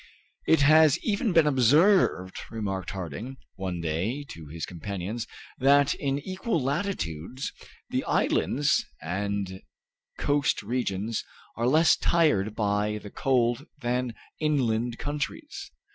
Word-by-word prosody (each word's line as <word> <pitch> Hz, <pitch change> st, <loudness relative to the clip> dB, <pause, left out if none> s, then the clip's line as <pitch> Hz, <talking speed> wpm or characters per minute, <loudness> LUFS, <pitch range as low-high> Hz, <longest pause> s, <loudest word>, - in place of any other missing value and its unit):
"It 160 Hz, -, +5 dB
has 155 Hz, +1 st, +6 dB
even 215 Hz, +1 st, 0 dB
been 165 Hz, -3 st, +5 dB
observed," 145 Hz, -, +3 dB
remarked 95 Hz, -5 st, -3 dB
Harding 95 Hz, -, -6 dB, 0.2 s
one 90 Hz, -3 st, -4 dB
day 90 Hz, -, -2 dB
to 80 Hz, -2 st, -9 dB
his 80 Hz, +2 st, -5 dB
companions, 100 Hz, +5 st, -5 dB, 0.3 s
"that 140 Hz, +1 st, +5 dB
in 140 Hz, -1 st, -1 dB
equal 185 Hz, +5 st, -2 dB
latitudes 130 Hz, -, -3 dB, 0.4 s
the -, -, 0 dB
islands 145 Hz, +1 st, +2 dB, 0.2 s
and 95 Hz, +2 st, -3 dB, 0.6 s
coast 145 Hz, 0 st, +1 dB
regions 115 Hz, -3 st, -2 dB, 0.3 s
are 115 Hz, +1 st, 0 dB
less 160 Hz, +4 st, +5 dB
tried 110 Hz, -, +2 dB
by 105 Hz, 0 st, 0 dB
the 105 Hz, -1 st, -10 dB
cold 125 Hz, +2 st, +1 dB
than 125 Hz, -2 st, -1 dB, 0.2 s
inland 120 Hz, -6 st, 0 dB
countries. 150 Hz, -, -5 dB
120 Hz, 115 wpm, -27 LUFS, 100-145 Hz, 0.6 s, has